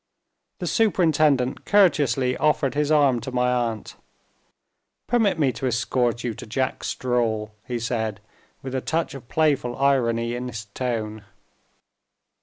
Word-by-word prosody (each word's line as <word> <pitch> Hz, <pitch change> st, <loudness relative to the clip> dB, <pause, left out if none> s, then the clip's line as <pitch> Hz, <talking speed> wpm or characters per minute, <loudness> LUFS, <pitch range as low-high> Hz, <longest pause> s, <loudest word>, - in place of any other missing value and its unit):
The -, -, -5 dB
superintendent 155 Hz, -, +2 dB
courteously 145 Hz, -, +3 dB
offered 150 Hz, -3 st, +1 dB
his 150 Hz, 0 st, 0 dB
arm 140 Hz, -5 st, +4 dB
to 130 Hz, -, -6 dB
my 125 Hz, 0 st, +1 dB
aunt. 115 Hz, -3 st, -2 dB, 1.1 s
"Permit 220 Hz, -6 st, +2 dB
me 140 Hz, -5 st, +2 dB
to 130 Hz, +3 st, -3 dB
escort 120 Hz, 0 st, 0 dB
you 120 Hz, -, -2 dB
to -, -, -10 dB
Jack 130 Hz, +4 st, -2 dB
Straw," 115 Hz, -4 st, -1 dB, 0.2 s
he 125 Hz, -, -2 dB
said, 110 Hz, -3 st, -2 dB, 0.4 s
with 130 Hz, -1 st, -6 dB
a 130 Hz, -, -1 dB
touch 160 Hz, +4 st, -1 dB
of 135 Hz, -3 st, -11 dB
playful 140 Hz, -6 st, +1 dB
irony 120 Hz, -4 st, +1 dB
in 125 Hz, +1 st, -4 dB
his 110 Hz, -3 st, -6 dB
tone. 110 Hz, -1 st, -4 dB
125 Hz, 135 wpm, -24 LUFS, 115-145 Hz, 1.1 s, arm